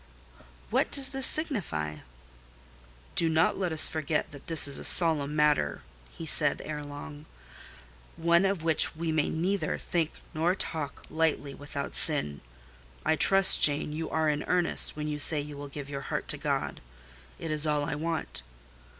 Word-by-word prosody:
"What - - 0
does 270 -2 +5
this 270 -1 +1
signify?" 160 - -3 1.2
"Do 165 - +1
not 160 +3 +1
let 180 -3 -2
us 160 - +4
forget 155 0 -3
that 145 -2 -14
this 165 -3 +8
is 140 - +2
a - - -9
solemn 150 -4 +3
matter," 150 - 0 0.3
he 165 - -10
said 150 -2 +2
ere 150 -1 -6
long; 145 +1 -11 0.9
"one 170 +2 +2
of 195 -4 -2
which 160 0 +2
we 165 0 -4
may 155 -2 -1
neither 175 +1 -2
think 165 -2 -3 0.2
nor 170 +3 0
talk 155 -6 -3
lightly 155 -3 -2
without 145 0 -7
sin. 140 - -2 0.6
I 160 - +2
trust, 195 +4 +6
Jane, 150 0 +1
you 160 +1 -5
are 160 -1 -1
in 150 -1 -1
earnest 180 -1 +4
when 150 0 -5
you 150 -1 -5
say 150 +1 +4
you 145 0 -8
will 145 0 -9
serve 140 0 -8
your 140 -1 -7
heart - - -5
to - - 0
God: - - -3 0.6
it 165 - -6
is 155 0 0
all 150 -1 -1
I 145 - -4
want. 160 - -5
155 Hz, 165 wpm, -27 LUFS, 145-165 Hz, 1.2 s, this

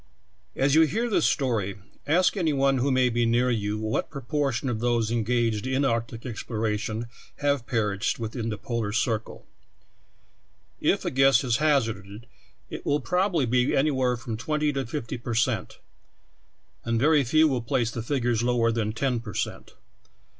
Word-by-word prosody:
As 135 +1 +2
you 160 - +6
read 225 - -1
this - - +3
story, 110 -8 0 0.3
ask 175 +7 +3
any 165 -6 +1
one 135 -1 +2
who 135 +3 +1
may 130 -1 +3
be 120 0 0
near 120 +2 +2
you 105 -2 -1
what 110 0 -2
proportion 140 -1 -2
of 120 -3 -1
those 120 -1 +1
engaged 115 -1 0
in 130 +2 +1
arc 115 -2 0
tic 115 +2 -10
exploration 110 -1 -3 0.3
have 140 -4 0
perished 105 -2 0
within 115 0 -4
the 105 - -3
polar 115 -4 -3
cir 115 -1 +1
cle. 110 - -14 1.3
If - - +1
a - - -1
guess 135 +2 +4
is 120 -3 +1
hazarded, 115 -8 0 0.5
it - - -6
will 145 - +1
probably 180 0 +1
be 125 +2 +2
any 145 +3 +3
where 130 -2 +1
from 115 -1 -5
twenty 150 +4 -1
to 135 -3 -3
fifty 125 -2 -5
per 120 -1 -4
cent, 115 -3 0 1.1
and 115 -1 0
very 150 +2 +4
few 155 +6 +4
will 130 -4 0
place 115 0 0
the 115 - -4
figures 120 -2 0
lower 120 -1 +2
than 110 -2 -1
ten 125 +1 0
per 110 -5 -9
cent. - - -4
120 Hz, 170 wpm, -26 LUFS, 115-135 Hz, 1.3 s, you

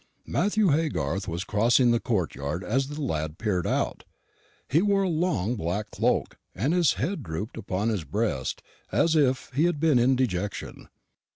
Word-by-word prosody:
Matthew 210 -1 +2
Haygarth 140 - 0
was 85 +1 -3
crossing 120 +5 +3
the 120 - +3
courtyard 85 - -2
as 135 +5 0
the 145 +2 -7
lad 80 - -2
peeped 100 -5 -1
out. - - -1 0.6
He 155 +6 +3
wore 200 -1 +2
a - - +1
long 155 - 0
black 100 +2 -3
cloak, - - 0 0.2
and 135 - 0
his 175 -3 +4
head 165 +4 -2
drooped 100 +2 -5
upon 100 +3 -2
his 105 -7 -1
breast 95 - -2 0.3
as 165 0 +2
if 135 -4 +2
he 150 +6 +3
had 175 -4 0
been 150 -5 +4
in 130 +2 +4
dejection. 105 -6 -3
120 Hz, 165 wpm, -26 LUFS, 95-155 Hz, 0.6 s, his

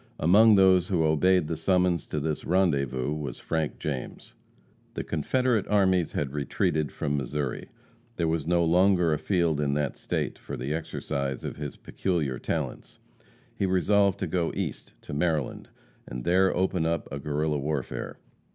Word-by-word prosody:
Among 105 +7 +6
those 95 -2 +5
who 90 -5 +1
obeyed 80 +2 +3
the 80 - -2
summons 90 0 +1
to 75 - -2
this 75 +1 -2
rendezvous 70 -7 +1
was 70 -5 -5
Frank 80 -2 -2
James. 70 -5 -5 0.6
The - - -3
Confederate 115 - 0
armies 95 -5 +2
had 70 -2 -2
retreated 75 +1 -1
from 70 - -2
Missouri. 70 0 -3 0.5
There 85 - 0
was 80 -2 -1
no 85 -1 +3
longer 90 -1 +4
a 75 - -1
field 85 -6 +1
in 70 -1 0
that 75 -3 -1
State - - -3
for 70 - -7
the 65 +5 -3
exercise 70 -4 -3
of - - -5
his 75 -1 -5
peculiar 75 -9 -2
talents. - - -4 0.6
He 95 - -1
resolved 100 +1 +3
to - - +1
go 85 0 0
East, - - -4
to - - -8
Maryland, 75 -2 -1 0.4
and - - -6
there 95 +4 +3
open 90 -3 +1
up 85 -1 -1
a 70 - -4
Guerrilla 75 +1 -1
warfare. 70 -2 -3
80 Hz, 160 wpm, -27 LUFS, 75-90 Hz, 0.6 s, Among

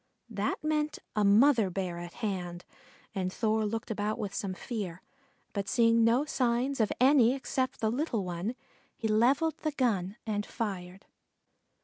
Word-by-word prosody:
That - - -2
meant 305 -1 0 0.2
a 210 - +2
mother 220 +1 +5
Bear 180 -2 -3
at 175 0 -8
hand, 180 -5 -4 0.5
and 185 -2 -2
Thor 220 +1 +1
looked 225 +2 -4
about 210 0 -1
with 200 -2 -4
some 200 -4 -3
fear, 190 -6 -5 0.5
but 200 -1 -2
seeing 230 -1 +4
no 240 +5 +3
signs 255 -1 0
of 215 - +1
any 255 -1 +5
except 260 -1 -2
the 220 -1 +2
little 240 - -1
one, 180 +7 -3 0.4
he 225 - -2
levelled 260 +9 +2
the 310 -2 -2
gun 210 -8 0
and 210 -2 -1
fired. 190 -4 -5
220 Hz, 150 wpm, -30 LUFS, 195-250 Hz, 0.5 s, mother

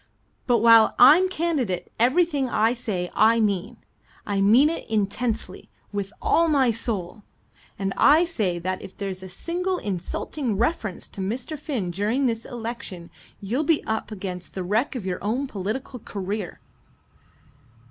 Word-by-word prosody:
"But 235 -3 +3
while 230 -1 +7
I'm 315 +9 +7
candidate 300 - -1
everything 280 +2 +2
I 225 +1 +2
say 210 -8 -3
I 225 +2 +4
mean. 210 +1 -1 0.5
I 200 -1 -1
mean 230 +9 +6
it 325 -6 -4
intensely 220 +2 -2 0.2
with 200 -1 -3
all 335 0 +3
my 275 -6 +3
soul. 215 -3 -4 0.6
And 195 0 -2
I 305 +4 +6
say 215 - -1
that 185 +2 -3
if - - -11
there's 195 -2 -5
a 190 - -9
single 360 - -2
insulting 210 - -3
reference 225 - -1
to 195 - -7
Mr. 235 +10 -3
Finn 260 - -3
during 215 +9 0
this 230 -2 -1
election, 225 -7 -6 0.3
you'll 225 +8 -1
be 310 0 +2
up 220 0 -3
against 185 -3 -6
the 190 - -3
wreck 220 +10 0
of 230 -7 -5
your 185 -1 -3
own 240 +7 -1
political 245 +3 -5
career." 200 -2 -5
220 Hz, 145 wpm, -24 LUFS, 195-265 Hz, 0.6 s, while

